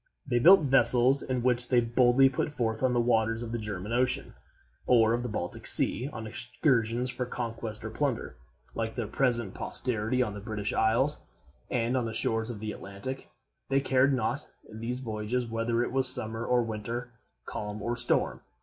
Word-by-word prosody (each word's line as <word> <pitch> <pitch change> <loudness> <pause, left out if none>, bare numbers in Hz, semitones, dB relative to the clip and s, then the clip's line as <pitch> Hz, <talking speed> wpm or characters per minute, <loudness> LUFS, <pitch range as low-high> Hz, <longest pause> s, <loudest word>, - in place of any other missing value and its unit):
They 120 -3 0
built 190 +9 +7
vessels, 135 -1 +6
in 125 -2 -3
which 125 -1 +2
they 125 - +4
boldly 120 +3 +4
put 135 +3 -2
forth 115 -5 -2
on 130 -1 +2
the 120 - +1
waters 115 -1 +1
of 115 - -6
the 120 - -3
German 105 0 -5
Ocean 125 +1 -1 0.5
or 115 -2 +4
of 120 - -1
the 125 - -4
Baltic 90 -4 -5
Sea 130 +4 +4
on 110 -4 -7
excursions 120 +1 -1
for 125 -1 -4
conquest 115 -3 -5
or 110 - -5
plunder. 130 - -2 0.4
Like 110 -1 -4
their 120 - -3
present 120 -3 0
posterity 125 0 +2
on 105 -4 -4
the 105 - -7
British 105 0 -4
isles 120 +7 +1 0.5
and 120 0 -1
on 125 -2 0
the 110 -1 -5
shores 110 0 0
of 115 -4 -6
the 110 -1 -4
Atlantic, 100 +7 -8 0.4
they 135 0 +3
cared 135 0 +2
not, 130 +2 -2 0.2
in 110 0 -11
these 125 +3 -4
voyages, 110 +1 -3
whether 115 +1 -1
it - - -4
was 130 0 +1
summer 115 -2 -3
or 125 -1 +2
winter, 115 +2 -5 0.3
calm 105 0 -6
or 120 +3 -3
storm. 120 0 0
120 Hz, 185 wpm, -28 LUFS, 110-125 Hz, 0.5 s, built